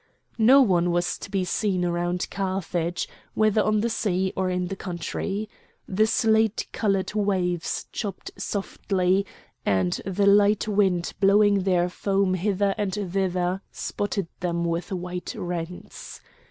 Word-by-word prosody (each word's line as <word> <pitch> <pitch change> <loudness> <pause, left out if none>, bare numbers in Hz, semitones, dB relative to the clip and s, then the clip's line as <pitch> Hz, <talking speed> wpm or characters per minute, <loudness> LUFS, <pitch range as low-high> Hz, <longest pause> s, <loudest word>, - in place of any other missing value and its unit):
No 260 +5 +7
one 175 -6 +2
was 175 0 0
to - - -8
be 195 -2 0
seen 185 -2 0
around 175 +1 -1
Carthage, 185 -3 -2 0.3
whether 215 0 +3
on 215 0 +2
the 235 - 0
sea 190 -4 0
or 190 -1 0
in 180 0 -1
the 195 - -3
country. 190 +3 -4 0.4
The 215 +3 +2
slate 220 -1 +2
coloured 195 -3 0
waves 185 -5 0
chopped 205 -4 -5
softly, 195 -1 -1 0.4
and 95 -3 +1
the 195 +1 0
light 205 +1 +4
wind 190 -4 +1
blowing 200 0 +5
their 180 -2 +3
foam 195 +1 0
hither 195 +1 +1
and 205 -2 0
thither 185 -2 -1
spotted 205 -2 -3
them 170 -1 -1
with 170 +2 -2
white 180 -1 -4
rents. 175 0 -6
190 Hz, 135 wpm, -25 LUFS, 180-205 Hz, 0.4 s, No